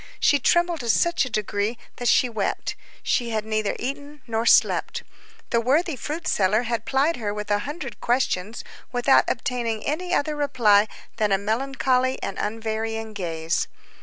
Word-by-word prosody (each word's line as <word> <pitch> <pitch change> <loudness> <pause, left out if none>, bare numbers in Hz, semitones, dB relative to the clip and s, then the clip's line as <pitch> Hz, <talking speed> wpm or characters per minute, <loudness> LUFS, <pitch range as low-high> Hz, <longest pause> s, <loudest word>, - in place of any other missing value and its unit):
She 285 - +4
trembled 345 +4 +2
to 240 -3 -4
such 340 +7 +3
a - - -5
degree 215 0 -1 0.2
that 245 - -2
she 250 - +5
wept. 220 -4 -2 0.3
She 240 -1 0
had 215 -1 -2
neither 215 -1 -1
eaten 285 +2 -6
nor 230 0 -1
slept. - - +3 0.5
The 235 - +3
worthy 295 +6 +2
fruit 305 +6 -5
seller 205 +4 +2
had 230 -1 -2
plied 280 +5 +1
her 215 -4 -2
with 210 0 -4
a 205 - +3
hundred 295 -4 -7
questions, 235 -4 0 0.3
without 245 +2 +4
obtaining 235 -3 -2
any 355 +5 -2
other 305 -3 +1
reply 235 -8 +3 0.3
than 210 -2 +1
a 195 - +4
melancholy 260 +4 0
and 195 - -4
unvarying 225 0 -3
gaze. 165 -4 -2
235 Hz, 160 wpm, -24 LUFS, 215-270 Hz, 0.5 s, she